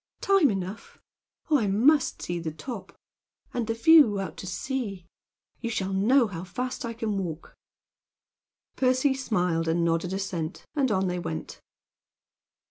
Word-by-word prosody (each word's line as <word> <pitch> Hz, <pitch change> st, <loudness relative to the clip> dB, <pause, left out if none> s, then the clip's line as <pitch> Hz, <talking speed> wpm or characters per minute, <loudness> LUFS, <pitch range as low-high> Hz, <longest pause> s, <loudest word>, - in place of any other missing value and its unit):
"Time 390 Hz, -7 st, +4 dB
enough. 195 Hz, +1 st, -5 dB, 0.5 s
Oh, 295 Hz, -, +5 dB
I 215 Hz, -, 0 dB
must 260 Hz, +9 st, +3 dB
see 175 Hz, 0 st, -3 dB
the 165 Hz, -1 st, -3 dB
top; 215 Hz, -, -8 dB, 0.6 s
and 240 Hz, -3 st, -2 dB
the 225 Hz, -, -1 dB
view 230 Hz, -4 st, +6 dB
out 195 Hz, -, -4 dB
to 185 Hz, -, -7 dB
sea! 200 Hz, -3 st, -4 dB, 0.5 s
You 235 Hz, -, -3 dB
shall 195 Hz, -4 st, -2 dB
know 235 Hz, +7 st, +4 dB
how 180 Hz, -5 st, -6 dB
fast 250 Hz, +8 st, -4 dB
I 235 Hz, -1 st, -3 dB
can 220 Hz, -3 st, -2 dB
walk." 170 Hz, -4 st, -6 dB, 1.2 s
Percy 260 Hz, +1 st, +2 dB
smiled 180 Hz, -10 st, 0 dB
and 170 Hz, +1 st, +1 dB
nodded 165 Hz, +2 st, 0 dB
assent, 190 Hz, -5 st, -4 dB
and 275 Hz, -3 st, +2 dB
on 190 Hz, -1 st, +1 dB
they 180 Hz, -1 st, -1 dB
went. 80 Hz, -, -6 dB
200 Hz, 145 wpm, -27 LUFS, 180-255 Hz, 1.2 s, view